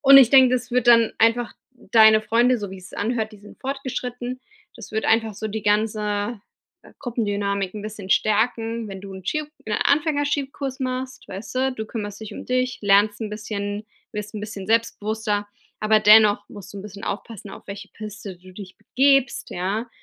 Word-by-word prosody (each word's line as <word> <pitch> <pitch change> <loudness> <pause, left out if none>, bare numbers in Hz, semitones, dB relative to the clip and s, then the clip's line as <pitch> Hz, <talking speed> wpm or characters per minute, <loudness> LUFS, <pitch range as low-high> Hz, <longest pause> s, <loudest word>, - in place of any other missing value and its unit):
und 275 -1 +8
ich 260 -4 +8
denk, 260 -2 +7
das 250 -1 -1
wird 250 -1 +1
dann 230 -2 +6
einfach 230 +2 +2 0.2
deine 220 -3 +5
Freunde 240 +3 +3
so 205 -2 -5
wie 190 - -8
es 185 +1 -12
anhört 220 0 -2
die 210 - -13
sind 205 +1 -16
fortgeschritten. 255 -2 -4 0.4
Das - - -11
wird 220 0 -1
einfach 225 -2 +2
so 220 - -4
die 215 +1 -4
ganze, 210 +1 0 0.4
äh, - - -17
Gruppendynamik 205 -5 -2
'n 210 - -6
bisschen 210 -3 -7
stärken, 225 +1 +1
wenn 195 -1 -7
du 195 0 -9
'n 190 -1 -10
Ski 305 +8 -1 0.2
'n 215 - -3
Anfänger 290 0 +2
Skikurs 275 -2 -3
machst, 255 0 -4
weißte? 255 +7 -2
Du 220 -3 -6
kümmerst 205 -2 -6
dich 215 - -8 0.2
dich, 255 0 0
lernst 205 +1 +3
'n 220 - -3
bisschen, 210 -1 -4 0.3
wirst 210 +1 -6
'n 210 - -4
bisschen 205 -2 -7
selbstbewusster, 220 -2 0 0.3
aber 215 0 +4
dennoch 210 -1 +6
musst 200 -1 -11
du 200 - -8
'n 195 - -8
bisschen 200 -1 -10
aufpassen, 205 0 -6
auf - - -12
welche 200 0 -8
Piste 205 -3 -8
du 185 +1 -16
dich 185 -1 -11
begibst, 270 +3 +2
ja. 200 +6 -2
220 Hz, 185 wpm, -23 LUFS, 205-245 Hz, 0.4 s, und